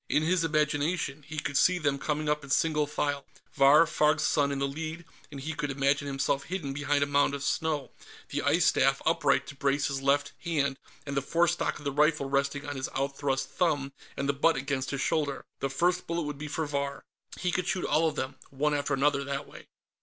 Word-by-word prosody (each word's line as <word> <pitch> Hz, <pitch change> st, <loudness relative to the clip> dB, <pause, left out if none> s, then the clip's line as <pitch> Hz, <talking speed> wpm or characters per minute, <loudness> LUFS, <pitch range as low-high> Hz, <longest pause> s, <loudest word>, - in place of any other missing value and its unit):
In 150 Hz, -, +2 dB
his 170 Hz, +1 st, +2 dB
imagination, 150 Hz, -1 st, 0 dB
he 155 Hz, 0 st, -7 dB
could 140 Hz, -1 st, -3 dB
see 180 Hz, +4 st, +4 dB
them 145 Hz, -4 st, 0 dB
coming 155 Hz, +1 st, -2 dB
up 150 Hz, 0 st, 0 dB
in 140 Hz, -, -11 dB
single 150 Hz, -1 st, +2 dB
file, 145 Hz, -1 st, -1 dB, 0.3 s
Vahr 140 Hz, +4 st, +7 dB
Farg's 150 Hz, -2 st, +2 dB
son 140 Hz, -2 st, +2 dB
in 140 Hz, -, -2 dB
the 140 Hz, 0 st, 0 dB
lead, 160 Hz, +4 st, -5 dB, 0.2 s
and 140 Hz, -2 st, -8 dB
he 155 Hz, +4 st, -4 dB
could 150 Hz, -2 st, -3 dB
imagine 140 Hz, +1 st, +1 dB
himself 140 Hz, 0 st, -1 dB
hidden 165 Hz, -7 st, -4 dB
behind 145 Hz, 0 st, +1 dB
a -, -, +2 dB
mound 145 Hz, 0 st, +2 dB
of 140 Hz, -, -5 dB
snow, 150 Hz, -1 st, -1 dB, 0.4 s
the -, -, -2 dB
ice -, -, +3 dB
staff -, -, +3 dB
upright -, -, +2 dB
to 140 Hz, -, -9 dB
brace 140 Hz, +1 st, +1 dB
his 135 Hz, -1 st, -3 dB
left 140 Hz, +1 st, +2 dB
hand 140 Hz, -5 st, 0 dB, 0.3 s
and 140 Hz, -1 st, -4 dB
the 140 Hz, -, +2 dB
forestock 170 Hz, +5 st, +1 dB
of 145 Hz, -, -13 dB
the 140 Hz, -, 0 dB
rifle 150 Hz, 0 st, +2 dB
resting 140 Hz, +1 st, 0 dB
on 145 Hz, -1 st, -4 dB
his 130 Hz, -, -3 dB
outthrust 135 Hz, 0 st, -1 dB
thumb 145 Hz, -6 st, 0 dB, 0.2 s
and 140 Hz, -, -1 dB
the 140 Hz, -, +2 dB
butt 155 Hz, +4 st, +3 dB
against 135 Hz, 0 st, -2 dB
his 140 Hz, -1 st, -2 dB
shoulder. 145 Hz, -4 st, -1 dB
The 135 Hz, -, -1 dB
first 175 Hz, +6 st, +1 dB
bullet 170 Hz, 0 st, -1 dB
would 150 Hz, -1 st, -5 dB
be 150 Hz, -, -5 dB
for 155 Hz, +1 st, -2 dB
Vahr. 140 Hz, -1 st, -3 dB, 0.3 s
He 180 Hz, -, -1 dB
could 180 Hz, 0 st, -1 dB
shoot 185 Hz, -, -1 dB
all 160 Hz, +1 st, +3 dB
of 155 Hz, -, -2 dB
them, 130 Hz, +1 st, -4 dB
one 150 Hz, +2 st, 0 dB
after 145 Hz, -1 st, 0 dB
another, 140 Hz, +1 st, +2 dB
that 140 Hz, 0 st, -3 dB
way.... -, -, -13 dB
145 Hz, 220 wpm, -29 LUFS, 140-155 Hz, 0.4 s, Vahr